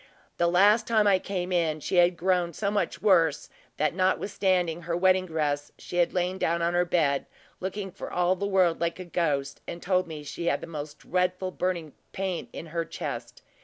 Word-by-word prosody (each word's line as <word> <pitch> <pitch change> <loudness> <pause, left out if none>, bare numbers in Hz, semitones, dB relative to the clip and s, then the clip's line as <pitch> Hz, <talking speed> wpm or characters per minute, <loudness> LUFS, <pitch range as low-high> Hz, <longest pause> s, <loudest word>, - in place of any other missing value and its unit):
The 170 - +3
last 200 +6 +4
time 220 -2 +3
I 195 -2 +5
came 185 -1 -3
in, 165 -3 +1
she 180 - -2
had 175 0 +5
grown 180 -1 +1
so 200 +4 -1
much 205 0 -1
worse, 165 -7 +3 0.3
that 155 - +1
notwithstanding 185 -2 +1
her 170 +1 -2
wedding 185 0 +3
dress, 145 -3 -1
she 175 - -7
had 175 -1 +3
lain 180 +1 -1
down 170 +1 +1
on 170 +1 +1
her 175 0 +3
bed, 150 -5 +1 0.3
looking 190 +1 -4
for 195 - -8
all 180 +1 +2
the 200 +2 -2
world 185 -4 +2
like 170 0 0
a 185 - -6
ghost, 145 -5 -1
and 170 - -5
told 185 0 +1
me 155 -2 -7
she 170 +3 -5
had - - +2
the - - -7
most 150 -2 -7
dreadful 180 +1 -1
burning 175 -5 -2 0.2
pain 190 -2 -3
in - - -7
her 170 -1 0
chest. - - -6
175 Hz, 200 wpm, -27 LUFS, 165-185 Hz, 0.3 s, I